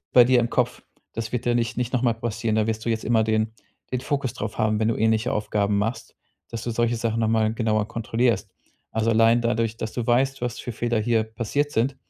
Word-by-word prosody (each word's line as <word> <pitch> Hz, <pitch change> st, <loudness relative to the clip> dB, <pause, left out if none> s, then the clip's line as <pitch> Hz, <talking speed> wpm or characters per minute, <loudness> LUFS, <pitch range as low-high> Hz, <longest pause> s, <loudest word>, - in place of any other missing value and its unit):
bei 125 Hz, -1 st, +8 dB
dir 125 Hz, 0 st, +4 dB
im 120 Hz, -, 0 dB
Kopf, 125 Hz, -1 st, 0 dB, 0.3 s
das 115 Hz, -1 st, -4 dB
wird 125 Hz, -, -2 dB
dir 120 Hz, -, +3 dB
nicht 120 Hz, 0 st, 0 dB
nicht 125 Hz, -1 st, -2 dB
noch 125 Hz, -, +1 dB
mal 120 Hz, -3 st, +3 dB
passieren. 115 Hz, -1 st, -2 dB
Da 110 Hz, -1 st, +2 dB
wirst 110 Hz, 0 st, -2 dB
du -, -, +1 dB
jetzt 110 Hz, -1 st, -1 dB
immer 115 Hz, -1 st, +3 dB
den 110 Hz, 0 st, 0 dB, 0.4 s
den 130 Hz, -, 0 dB
Fokus 140 Hz, -2 st, -2 dB
drauf 105 Hz, 0 st, -5 dB
haben, 110 Hz, 0 st, +1 dB
wenn 110 Hz, -, +2 dB
du 115 Hz, -, +1 dB
ähnliche 110 Hz, +1 st, +1 dB
Aufgaben 105 Hz, -1 st, 0 dB
machst, 115 Hz, +3 st, -3 dB, 0.3 s
dass 115 Hz, -, -5 dB
du 120 Hz, -, -2 dB
solche 120 Hz, +1 st, +1 dB
Sachen 115 Hz, 0 st, -1 dB
nochmal 110 Hz, -1 st, +2 dB
genauer 110 Hz, -2 st, 0 dB
kontrollierst. 115 Hz, -1 st, 0 dB, 0.4 s
Also, 110 Hz, +1 st, +1 dB
allein 115 Hz, +1 st, +4 dB
dadurch, 115 Hz, -1 st, 0 dB
dass 110 Hz, -, -4 dB
du 120 Hz, -2 st, -3 dB
weißt, 135 Hz, +3 st, +2 dB
was 120 Hz, -1 st, -2 dB
für 120 Hz, -, -5 dB
Fehler 120 Hz, 0 st, -1 dB
hier 115 Hz, 0 st, +2 dB
passiert 115 Hz, +6 st, -2 dB
sind, 125 Hz, +4 st, 0 dB
115 Hz, 230 wpm, -24 LUFS, 110-120 Hz, 0.4 s, bei